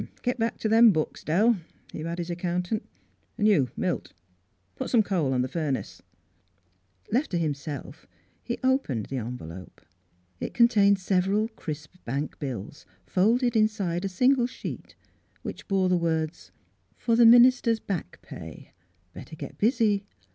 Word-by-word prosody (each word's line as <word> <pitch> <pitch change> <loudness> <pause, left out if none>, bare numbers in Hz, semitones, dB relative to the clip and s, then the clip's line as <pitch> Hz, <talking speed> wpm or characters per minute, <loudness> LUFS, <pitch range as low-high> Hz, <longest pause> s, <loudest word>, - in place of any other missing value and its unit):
"Git 250 0 -1
back 230 +1 0
to - - -2
them 225 +2 +7
books, 155 -4 -2
Dell," 210 +8 +3 0.4
he - - -5
bade 165 +2 -4
his 175 0 -4
accountant; 180 +4 -2 0.3
" - - -42
an' 210 - +1
you, 165 - +4
Milt, - - -2 0.6
put - - -4
some 230 -3 +4
coal 170 -10 0
in 125 - +2
the - - -2
furnace." 140 - -3 1.1
Left 255 +8 +1
to 175 - -1
himself 145 -2 -4 0.3
he 240 - -4
opened 255 - +1
the 135 - -5
envelope. 95 -7 -7 0.6
It - - -5
contained 210 -4 +5
several 195 +3 +1
crisp 155 -5 -8
bank 140 +5 -4
bills 130 -2 -6 0.2
folded 235 +6 +2
inside 200 -5 +1
a 195 - -1
single 250 +6 +3
sheet 250 - -8 0.5
which - - -7
bore 195 -2 +2
the 180 0 +3
words: 160 -2 -2 0.2
" - - -41
For 230 - +1
the 235 0 +7
minister's 240 -1 +6
back 180 - -5
pay. - - -10 0.4
Better 160 - -10
get - - -9
busy. 215 -3 +2
185 Hz, 150 wpm, -26 LUFS, 155-225 Hz, 1.1 s, them